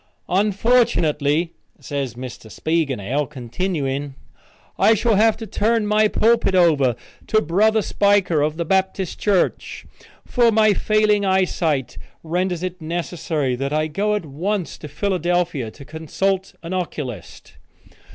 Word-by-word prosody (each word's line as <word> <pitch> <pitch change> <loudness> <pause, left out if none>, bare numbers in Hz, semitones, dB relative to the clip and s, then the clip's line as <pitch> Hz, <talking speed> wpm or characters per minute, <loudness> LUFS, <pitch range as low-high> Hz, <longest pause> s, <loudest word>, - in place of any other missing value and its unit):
"Unfortunately," 180 - +2 0.3
said 140 -2 -3
Mr. 125 -2 -9
Spiegelnail, 140 -3 -1
continuing, 140 0 -3 0.6
"I 225 - +5
shall 225 +2 +1
have 220 +2 +3
to 225 - -7
turn 220 +1 0
my 210 +1 +3
pulpit 225 -2 +2
over 150 -9 +4 0.3
to 215 - +3
Brother 215 +5 +2
Spiker 200 -7 +2
of 155 +1 -1
the 170 - -2
Baptist 190 0 -1
Church, 200 -3 0 0.4
for 240 -2 +3
my 215 -1 +4
failing 215 0 +2
eyesight 170 - 0 0.2
renders 175 +1 -2
it 185 -1 -5
necessary 155 -4 -2
that 140 +2 -3
I 155 0 +1
go 205 +7 -1
at 205 - -3
once 175 +6 -3
to 150 - -8
Philadelphia, 175 - -1
to 140 +5 -13
consult 185 +5 -2
an 170 +2 -5
oculist. 145 - -6
175 Hz, 125 wpm, -21 LUFS, 150-205 Hz, 0.6 s, I